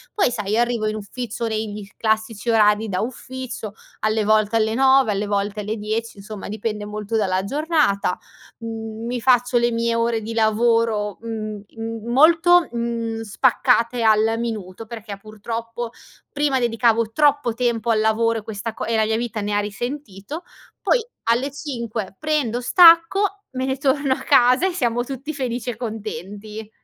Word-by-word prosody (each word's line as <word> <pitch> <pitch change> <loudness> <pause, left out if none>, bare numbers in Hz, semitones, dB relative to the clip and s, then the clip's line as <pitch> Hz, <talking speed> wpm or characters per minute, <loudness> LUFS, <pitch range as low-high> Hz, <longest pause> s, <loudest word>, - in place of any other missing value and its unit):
Poi, 390 - +2
sai, 210 -1 -1
arrivo 235 -2 +1
in 215 - -2
ufficio 230 +2 -5
negli 215 -2 -4
classici 220 0 -1
orari 215 -1 +3
da 185 -1 -1
ufficio: 250 -2 -6 0.3
alle 215 0 +1
volte 215 0 +3
alle 220 0 +2
9, 265 -2 +4
alle 205 +1 -1
volte 205 +1 -1
alle 210 +1 -3
10,, 215 +1 -3
insomma 205 0 -8
dipende 210 0 -4
molto 210 +1 -4
dalla 190 -3 +1
giornata, 290 - +1 0.4
mhmm, 225 0 -6
mi 245 0 -3
faccio 245 0 +3
le 240 - +2
mie 230 0 0
ore 230 -1 0
di 225 - -5
lavoro, 220 -2 +1
mhmm, 215 -2 -5
in 225 0 -7
molto, 335 +5 +5
mhmm, 230 -1 -3
spaccate 235 +2 +2
al 220 0 +3
minuto 220 -3 -5
perchè, 220 -3 -7
purtroppo 230 +2 -6 0.4
prima 290 -2 +1
dedicavo 230 -2 +2
troppo 290 -2 +2
tempo 235 -1 0
al 220 - +2
lavoro 225 +1 +2
e - - -12
questa 220 +1 -5
co - - -5
e 230 0 0
la 220 - +3
mia 220 0 0
vita 230 -2 -3
ne 205 0 -2
ha 205 - +2
risentito, 240 - -5 0.4
poi - - +3 0.2
alle 240 +5 +1
5 235 -9 -5
prendo, 295 -7 0
stacco 355 +7 +5
me 260 0 -2
ne 265 0 -1
torno 275 0 +1
a - - -6
casa, 255 +3 +5
e - - -1
siamo 240 -6 0
tutti 270 +3 -6
felici 250 -3 -3
e 235 - -3
contenti. 215 -1 -6
230 Hz, 160 wpm, -22 LUFS, 215-245 Hz, 0.4 s, molto